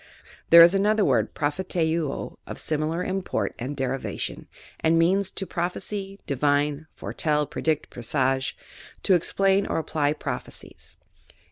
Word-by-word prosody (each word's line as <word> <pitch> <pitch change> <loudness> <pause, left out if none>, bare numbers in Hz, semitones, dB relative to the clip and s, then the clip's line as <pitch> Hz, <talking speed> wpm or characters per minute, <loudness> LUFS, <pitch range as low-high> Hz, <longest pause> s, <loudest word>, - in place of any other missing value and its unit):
There 170 0 +10
is 170 +2 +6
another 210 +2 +2
word, - - +1
propheteuo, 160 -1 -1
of - - -6
similar 155 +3 0
import 190 0 -2
and 135 +4 -5
derivation, 135 0 -3 0.3
and 160 +1 +3
means, 190 +4 +3
to 195 - -5
prophesy, 195 +3 -3
divine, 145 +2 0
foretell, 150 -1 -1
predict, 155 +2 -2
presage; 130 +2 0 0.5
to 195 - +4
explain 195 +3 +2
or - - -1
apply 150 -2 0
prophecies. 155 - -7
160 Hz, 120 wpm, -25 LUFS, 145-185 Hz, 0.5 s, There